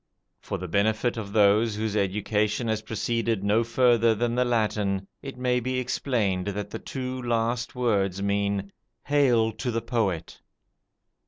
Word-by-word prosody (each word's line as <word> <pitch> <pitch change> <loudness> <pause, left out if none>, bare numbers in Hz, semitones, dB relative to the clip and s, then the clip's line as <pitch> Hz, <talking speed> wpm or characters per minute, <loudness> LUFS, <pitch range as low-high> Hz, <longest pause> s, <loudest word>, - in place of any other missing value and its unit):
For - - -4
the 90 - -6
benefit 110 +6 +1
of 105 -3 -5
those 105 +1 +4
whose 110 0 -2
education 105 +3 0
has 110 -1 0
proceeded 115 -1 -1
no 105 +3 +3
further 115 -1 +3
than 120 +2 0
the 125 +1 +2
Latin, 105 -5 0 0.2
it 135 -2 -8
may 125 0 +1
be 130 +2 -2
explained 110 -7 -1
that 100 0 -4
the - - -5
two 130 -1 -5
last 120 0 -1
words 100 -6 +1
mean, 100 0 -1 0.3
"Hail 125 -6 +3
to 110 +3 -4
the 115 -1 0
poet". 110 -8 -2
110 Hz, 150 wpm, -26 LUFS, 100-120 Hz, 0.3 s, those